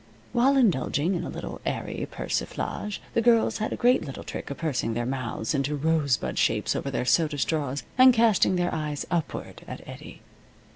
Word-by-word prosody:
While 260 +3 +4
indulging 175 - +2
in 175 -1 -2
a - - -5
little - - -7
airy - - -3
persiflage 210 -1 -3
the 230 - +2
girls 230 -1 +3
had 215 - -2
a - - -1
great 250 +2 +3
little 135 - -7
trick - - -6
of 140 - -5
pursing 130 -8 -1
their 120 0 -1
mouths 125 -3 -3
into 140 +1 0
rosebud 145 -4 +1
shapes - - +1
over 140 - -2
their 130 -2 -2
soda 150 +2 +2
straws, 145 -2 -1 0.2
and 255 0 +9
casting 225 -5 +3
their 175 0 0
eyes 150 -2 -3
upward 170 -4 -3
at - - -8
Eddie. - - -10
160 Hz, 180 wpm, -26 LUFS, 140-215 Hz, 0.2 s, and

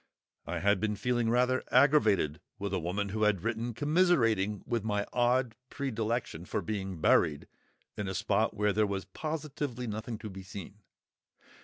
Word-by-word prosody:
I 85 0 -3
had 100 +1 +3
been 105 +1 0
feeling 120 +1 0
rather 125 +2 +2
aggravated 110 - +4 0.2
with 100 -1 -4
a - - +1
woman 100 +5 -2
who 110 +2 -3
had 105 -4 +2
written 115 0 -2
commiserating 120 - +2
with 115 -3 -1
my 105 -2 0
odd 125 0 +2 0.2
predilection 115 - -2
for - - -2
being 95 -5 -4
"buried" 75 -1 +3 0.5
in 105 - -3
a 95 - -3
spot 105 +3 +1
where 105 -1 +2
there 105 -1 +2
was 100 -1 -3
"positively 145 -5 -4
nothing 110 +1 -4
to 105 - -7
be 95 0 -8
seen." 95 +1 -9
110 Hz, 160 wpm, -31 LUFS, 100-125 Hz, 0.5 s, aggravated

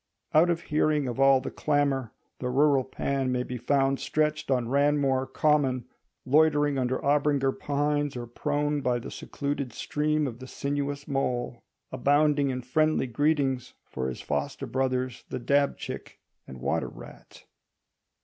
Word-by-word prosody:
Out 160 +3 +5
of 170 -1 0
hearing 150 -2 +1
of 125 +1 -4
all 135 -1 +5
the - - -5
clamour, 140 -5 0 0.3
the 125 - -2
rural 140 +1 +3
Pan 135 0 -2
may 125 0 0
be 125 0 -6
found 135 +2 +1
stretched 155 -1 -1
on 125 -3 +1
Ranmore 140 -1 +2
Common, 135 -3 +1 0.4
loitering 145 0 +3
under 130 0 0
Abinger 140 -1 +2
pines, 145 -1 0
or 120 - -5
prone 145 +4 -1
by 125 -2 +1
the 120 - -7
secluded 140 -2 -4
stream 150 0 0
of 120 -3 -5
the 130 - -9
sinuous 140 +1 -3
Mole, 125 -4 -2 0.3
abounding 145 +2 +2
in 130 -1 -3
friendly 155 +5 +2
greetings 135 -1 0
for 65 0 -4
his 65 - -6
foster 70 -1 -3
brothers 130 -1 -1
the - - -3
dab 140 +3 +1
chick - - -7 0.3
and 65 -1 -10
water - - 0
rat. - - -14
140 Hz, 150 wpm, -27 LUFS, 130-145 Hz, 0.4 s, Out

